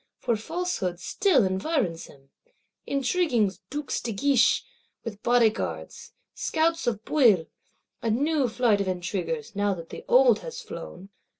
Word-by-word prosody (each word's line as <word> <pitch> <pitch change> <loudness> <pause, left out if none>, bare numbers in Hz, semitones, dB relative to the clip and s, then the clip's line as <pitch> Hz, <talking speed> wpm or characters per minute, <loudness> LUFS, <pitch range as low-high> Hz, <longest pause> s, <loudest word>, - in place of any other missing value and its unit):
For 235 -2 0
falsehood 220 - -3
still 290 - +2
environs 190 - -1
him; 135 -1 -19 0.6
intriguing 270 - +1 0.2
Dukes 290 -1 -3
de 235 - -3
Guiche, 255 +4 +3 0.4
with 210 -2 -7
Bodyguards; 235 -3 0 0.2
scouts 330 -1 0
of 220 -2 -1
Bouillé; 225 - +4 0.5
a 230 - -1
new 280 +4 +1
flight 220 -3 +2
of 195 - -2
intriguers, 190 +5 -3
now 205 -1 +1
that 165 -2 -10
the - - -8
old 250 -3 +5
is 485 - -6
flown. 190 +3 -9
230 Hz, 130 wpm, -26 LUFS, 195-280 Hz, 0.6 s, old